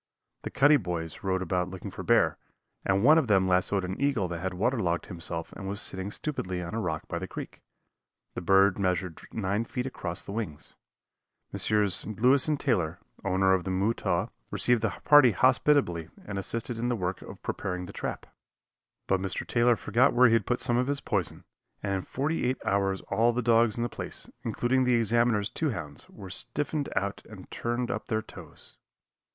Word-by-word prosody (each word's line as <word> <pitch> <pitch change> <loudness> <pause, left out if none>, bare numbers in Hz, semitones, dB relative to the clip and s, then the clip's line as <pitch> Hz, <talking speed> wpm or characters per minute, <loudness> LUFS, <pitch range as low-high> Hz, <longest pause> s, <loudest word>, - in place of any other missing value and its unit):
The - - -5
Cuddy 145 +2 +5
boys 85 - -5
rode 95 -1 0
about 90 0 -1
looking 95 -1 -7
for - - -7
bear, - - +3 0.4
and 95 +1 +1
one 155 +5 +7
of 145 - -1
them 95 -3 +3
lassoed 95 +1 +1
an 95 +7 -5
eagle 135 -9 +1
that 85 -1 -4
had 95 +1 -3
waterlogged 95 -5 0
himself 85 -2 -5
and 95 - -7
was 100 +1 -1
sitting 95 +1 0
stupidly 100 -7 -3
on 90 +1 -5
a 115 - -1
rock 80 -7 -3
by 85 - -3
the 95 - -5
creek. - - -8 0.7
The - - -5
bird 95 +2 +4
measured 90 -3 -1
nine 105 +1 -1
feet 125 +2 -4
across 90 -9 -4
the - - -8
wings. 100 -9 -5 0.8
Messrs. 105 -3 +2
Louis 125 +7 +3
and 150 -2 0
Taylor, 90 - 0 0.3
owners 95 0 +3
of - - -10
the - - -4
Mutaw, 100 +5 0 0.2
received 120 -2 +2
the 110 - +1
party 145 -6 +7
hospitably 95 - +2 0.2
and 100 -1 -4
assisted 115 +3 -3
in 120 +1 -1
the 120 - +1
work 90 -3 -3
of - - -11
preparing 90 -2 -3
the - - -10
trap. - - -5 0.8
But 95 -1 +1
Mr. 95 -1 -3
Taylor 120 0 +3
forgot 120 +6 +2
where 125 +1 +6
he - - +3
had 115 - +2
put 125 - 0
some 120 - +1
of 125 +1 +1
his 140 0 0
poison, 100 - -2 0.4
and 100 -1 -1
in 95 - -1
forty 145 - -2
eight 130 +1 +1
hours 95 -1 +1
all 115 +4 +3
the 125 +1 -1
dogs 115 -1 +3
in 120 - 0
the - - 0
place, 110 - -5 0.2
including 130 +2 +1
the 125 -1 +3
Examiner's 115 -2 +2
two 155 +7 -2
hounds, 75 - -6
were 95 -2 -10
stiffened 145 +7 -1
out 100 0 -2
and 100 -4 -12
turned 120 +1 -2
up - - -4
their 110 -1 -1
toes. - - -13
100 Hz, 190 wpm, -28 LUFS, 95-120 Hz, 0.8 s, one